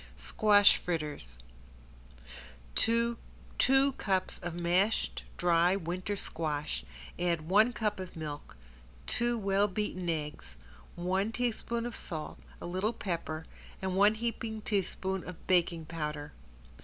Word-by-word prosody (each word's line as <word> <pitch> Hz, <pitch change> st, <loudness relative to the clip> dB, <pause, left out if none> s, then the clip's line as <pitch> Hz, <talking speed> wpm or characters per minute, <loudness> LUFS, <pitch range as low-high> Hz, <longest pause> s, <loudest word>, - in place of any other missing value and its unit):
~SQUASH 205 Hz, -, +5 dB
FRITTERS~ 150 Hz, -, -3 dB, 1.4 s
To 230 Hz, -, +2 dB, 0.4 s
two 270 Hz, +1 st, +5 dB
cups 190 Hz, -2 st, 0 dB
of 175 Hz, -1 st, -5 dB
mashed 180 Hz, +5 st, +1 dB
dry 175 Hz, +1 st, +4 dB
winter 185 Hz, +2 st, -2 dB
squash 150 Hz, -, -2 dB, 0.4 s
add 170 Hz, -2 st, +1 dB
one 210 Hz, +6 st, +5 dB
cup 210 Hz, -4 st, -1 dB
of 185 Hz, -1 st, -7 dB
milk, 150 Hz, -, -6 dB, 0.5 s
two 240 Hz, 0 st, +1 dB
well 200 Hz, -1 st, +2 dB
beaten 185 Hz, -3 st, -2 dB
eggs, 150 Hz, -, -4 dB, 0.4 s
one 190 Hz, +4 st, 0 dB
teaspoon 235 Hz, 0 st, -1 dB
of 240 Hz, -, -4 dB
salt, 155 Hz, -4 st, -5 dB, 0.2 s
a -, -, -7 dB
little 185 Hz, +6 st, 0 dB
pepper 165 Hz, -6 st, -3 dB, 0.3 s
and 190 Hz, -1 st, -2 dB
one 205 Hz, +2 st, +5 dB
heaping 225 Hz, -1 st, -3 dB
teaspoon 190 Hz, -2 st, -1 dB
of 180 Hz, -, -9 dB
baking 170 Hz, -3 st, +2 dB
powder. 150 Hz, -2 st, -4 dB
185 Hz, 120 wpm, -31 LUFS, 165-210 Hz, 1.4 s, ~SQUASH